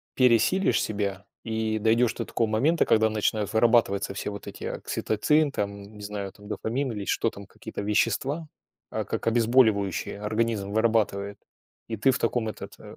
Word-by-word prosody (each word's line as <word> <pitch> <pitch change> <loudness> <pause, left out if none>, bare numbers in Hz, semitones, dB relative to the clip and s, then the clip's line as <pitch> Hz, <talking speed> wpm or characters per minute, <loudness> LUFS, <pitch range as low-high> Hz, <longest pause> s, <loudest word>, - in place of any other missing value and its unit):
пересилишь 125 - +3
себя 100 -2 -3 0.2
и 110 -1 -1
дойдешь 115 +2 +2
до 115 - -3
такого 115 - 0
момента, 135 +11 +2
когда 110 0 +4
начинают 105 -1 -1
вырабатываться 110 -4 +3
все 95 - -3
вот 100 - -8
эти - - -8
окситоцин, 150 +7 0
там, 100 -4 -3
не - - -11
знаю, 100 -1 -5
там, 105 +1 -15
дофамин 120 +6 -2
или 105 -3 -5
что 115 - +1
там, 100 -2 -11
какие-то - - -8
вещества, 130 +9 0 0.4
а - - -2
как - - -4
обезболивающее 110 -5 +2
организм 110 -1 -1
вырабатывает. 105 -2 +1 0.5
И 115 - -3
ты 115 +5 +2
в 130 - +3
таком, 115 -1 0
этот, 105 - -8
э, - - -15
110 Hz, 160 wpm, -26 LUFS, 100-115 Hz, 0.5 s, когда